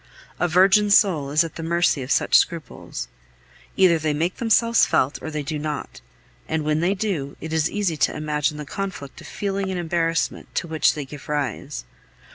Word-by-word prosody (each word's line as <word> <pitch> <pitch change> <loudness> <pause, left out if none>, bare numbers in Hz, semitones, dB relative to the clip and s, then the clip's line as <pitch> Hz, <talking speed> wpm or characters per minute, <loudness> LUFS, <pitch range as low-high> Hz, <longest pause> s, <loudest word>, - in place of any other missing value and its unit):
A 175 - +2
virgin 195 +4 +4
soul 180 -9 +4
is 155 +3 +3
at 165 - -7
the - - -5
mercy 170 -3 +1
of 125 - -6
such - - +2
scruples. 165 -3 0 0.7
Either 180 -4 +5
they 155 -1 -1
make 170 +5 -1
themselves 230 0 +3
felt 135 +3 +1
or - - -5
they 150 -1 -4
do 150 +1 -3
not; 150 -1 -5 0.5
and 160 -1 -1
when 150 0 +1
they 180 +4 +1
do, 180 -9 -3
it 160 +1 -6
is 160 0 +1
easy 195 -6 -1
to - - +1
imagine 150 0 -1
the 150 - -6
conflict 185 -5 -6
of - - -11
feeling 195 -1 -3
and 185 -1 -2
embarrassment 165 -1 -1
to 175 - -1
which 160 -1 +2
they 150 -2 -4
give 145 +2 -11
rise. 140 - -3
160 Hz, 190 wpm, -23 LUFS, 150-185 Hz, 0.7 s, Either